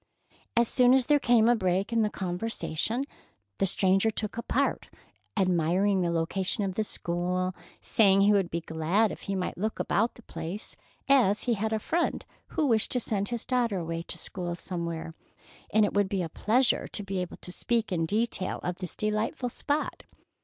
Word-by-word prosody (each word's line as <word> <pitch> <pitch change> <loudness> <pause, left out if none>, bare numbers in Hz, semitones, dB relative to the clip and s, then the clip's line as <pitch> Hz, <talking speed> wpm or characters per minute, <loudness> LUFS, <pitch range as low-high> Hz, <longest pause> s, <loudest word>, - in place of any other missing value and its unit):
As 235 0 +5
soon 250 +1 +5
as 265 -2 +3
there 295 +1 +4
came 240 -3 +4
a 240 - +5
break 190 +1 0
in 230 - +3
the 210 - +2
conversation, 205 - -2 0.5
the 195 - +3
stranger 195 +3 +3
took 215 -1 -3
a 235 - -3
part, 275 +4 0 0.5
admiring 185 +1 +2
the 175 - +1
location 175 +4 -1
of 195 -1 -1
the 220 - 0
school, 180 -1 -1
and 185 - -9 0.3
saying 195 -3 +4
he 205 +1 +5
would 195 -4 +2
be 170 - -2
glad 165 +7 +1
if - - -8
he 195 - 0
might 180 -1 -3
look 215 +2 -1
about 225 +3 +1
the 240 - -15
place, 165 +4 -6 0.3
as 245 -7 +4
he 245 - +1
had 220 +1 -1
a 220 - +1
friend 335 +10 -1 0.2
who 315 - 0
wished 225 -5 +2
to 250 - +2
send 205 -3 -2
his 240 -2 -3
daughter 240 -5 +1
away 165 -1 -3
to - - -2
school 175 -2 -3
somewhere, 170 -2 -5 0.6
and 215 0 +5
it - - -2
would 205 -1 +2
be 190 -2 0
a 165 - -4
pleasure 240 +9 +2
to 205 - -5
be 195 -1 -3
able 180 -1 -5
to 180 - -8
speak 230 +3 -1
in 165 -3 0
detail 215 -1 -1
of 180 0 -2
this 180 -4 -6
delightful 215 +4 -1
spot. 290 +5 -2
200 Hz, 195 wpm, -28 LUFS, 180-230 Hz, 0.6 s, As